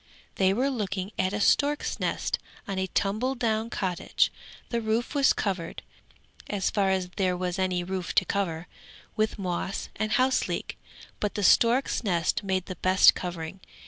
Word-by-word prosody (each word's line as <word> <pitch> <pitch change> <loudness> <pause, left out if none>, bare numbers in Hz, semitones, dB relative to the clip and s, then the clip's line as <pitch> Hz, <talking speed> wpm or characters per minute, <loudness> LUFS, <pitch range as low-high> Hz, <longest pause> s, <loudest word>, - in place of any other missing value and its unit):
They 190 -1 +4
were 255 +7 +1
looking 195 -5 -3
at 185 0 +2
a 205 - -2
stork's 290 +7 +2
nest - - -1 0.3
on 195 -2 -2
a 190 - 0
tumble 215 +8 0
down 225 -2 0
cottage; 185 -5 0 0.4
the 235 -1 -1
roof 225 +4 -1
was 280 -2 +4
covered, 185 -5 -2 0.7
as 200 -2 0
far 200 -2 +2
as 190 -1 0
there 185 -2 +1
was 180 +1 -2
any 185 -1 0
roof 185 0 -4
to 185 - +4
cover, 175 -5 -2 0.5
with 215 0 0
moss 185 -1 -3
and 215 +1 -1
house 255 +1 +3
leek; - - -3 0.4
but 210 - -2
the 205 - -1
stork's 240 +8 +4
nest 175 -5 +1
made 190 -2 -1
the 185 -3 -7
best 185 +2 +6
covering. 175 0 -5
195 Hz, 165 wpm, -27 LUFS, 185-220 Hz, 0.7 s, best